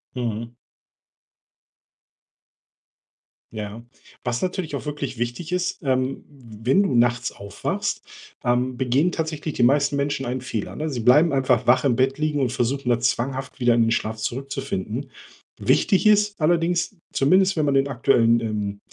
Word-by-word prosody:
Mhm. 115 -1 -3 3.0
Ja. 105 +1 -6 0.4
Was 125 -1 -1
natürlich 180 -4 -3
auch 140 - -7
wirklich 145 -4 -4
wichtig 120 +9 -4
ist, 180 0 -2
ähm, 130 -1 -1
w 120 -4 -5
wenn 195 - +5
du 140 - 0
nachts 120 +1 +2
aufwachst 100 0 -3 0.4
ähm, 125 +1 0
begehen 135 +7 +2
tatsächlich 155 -1 -3
die - - -1
meisten 140 +3 +3
Menschen 140 -1 -1
einen 125 +1 -3
Fehler, 115 -4 -4
ne? 155 +1 -3
Sie 130 -5 -3
bleiben 150 +8 +5
einfach 130 -3 +2
wach 130 +2 +4
im 130 - +3
Bett 130 +3 +1
liegen 150 -1 0
und 130 -3 +1
versuchen 130 +2 -1
dann 120 -1 +1
zwanghaft 130 +2 -2
wieder 120 -1 +4
in 115 - +3
den 115 - +2
Schlaf 110 -1 -1
zurückzufinden. 125 0 -4 0.5
Wichtig 195 +2 +2
ist 210 -1 +3
allerdings, 170 +4 +1 0.2
zumindest 185 +6 +3
wenn 155 - +1
man 140 - +1
den 135 0 +3
aktuellen, 120 -3 +3
ähm, 105 -3 -3
130 Hz, 150 wpm, -23 LUFS, 120-150 Hz, 3.0 s, wenn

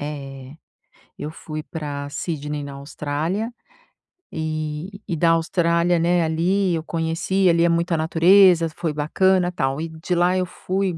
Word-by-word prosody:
É, 135 -2 -7 0.6
eu 150 - -5
fui 155 -1 -7
pra 145 -3 -5
Sydney, 150 -2 -4
na 140 0 -7
Austrália, 150 - -3 0.8
e 155 +4 -4
e 170 - -1
da 165 +1 +3
Austrália, 170 +1 +2
né, 175 +1 +2
ali, 175 +4 +1
eu 160 - -3
conheci, 165 +4 0
ali, 170 0 +3
é 170 - +4
muita 170 +1 +1
natureza, 170 +2 +5
foi 170 -2 -2
bacana, 180 +4 +2
tal 135 -5 -1
e 165 - -4
de 160 +3 -3
lá 175 +1 +3
eu 185 - +1
fui 185 0 -2
165 Hz, 150 wpm, -22 LUFS, 150-180 Hz, 0.8 s, natureza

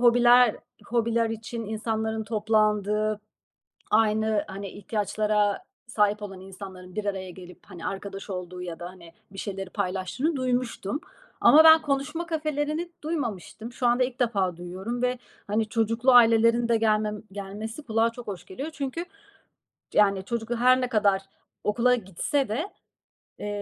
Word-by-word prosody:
hobiler 245 -1 +6 0.3
hobiler 230 -1 +1
için 225 +1 -5
insanların 220 0 -2
toplandığı, 215 -1 +1 0.7
aynı, 220 -1 +2
hani, 195 +1 -6
ihtiyaçlara 210 - 0 0.2
sahip 210 -2 +1
olan 195 -2 -7
insanların 190 -1 -10
bir 215 - -2
araya 190 -2 -3
gelip, 180 0 -12
hani, 180 -4 -8
arkadaş 195 +1 -6
olduğu 180 -1 -5
ya 170 -2 -6
da, 175 - -5
hani, 175 -2 -14 0.2
bir 195 - -11
şeyleri 195 -2 -5
paylaştığını 200 - -1
duymuştum 250 -1 -1 0.4
ama 315 +2 +8
ben 320 0 +9
konuşma 305 +4 -2
kafelerini 310 +1 -2
duymamıştım. 235 - -4
Şu 245 0 -1
anda 245 +1 +4
ilk 250 0 -6
defa 195 -8 +1
duyuyorum 190 +8 -5
ve, 250 0 +1 0.3
hani, 215 +1 0
çocuklu 230 +3 +2
ailelerin 230 0 +6
de 235 - +4
gelmem 215 -1 +1
gelmesi 205 +6 -6
kulağa 225 -2 +1
çok 240 +1 -10
hoş 185 -4 -6
geliyor. 270 - -6
Çünkü, 285 +4 -4 0.9
yani, 195 -2 +3
çocuk 235 +1 -4
da 240 - 0
her 255 +1 +5
ne 250 - -1
kadar 205 -5 +2 0.4
okula 240 +4 +3
gitse 235 - -1
de, 300 - -2 0.7
eee, - - -6
220 Hz, 140 wpm, -26 LUFS, 200-245 Hz, 0.9 s, ben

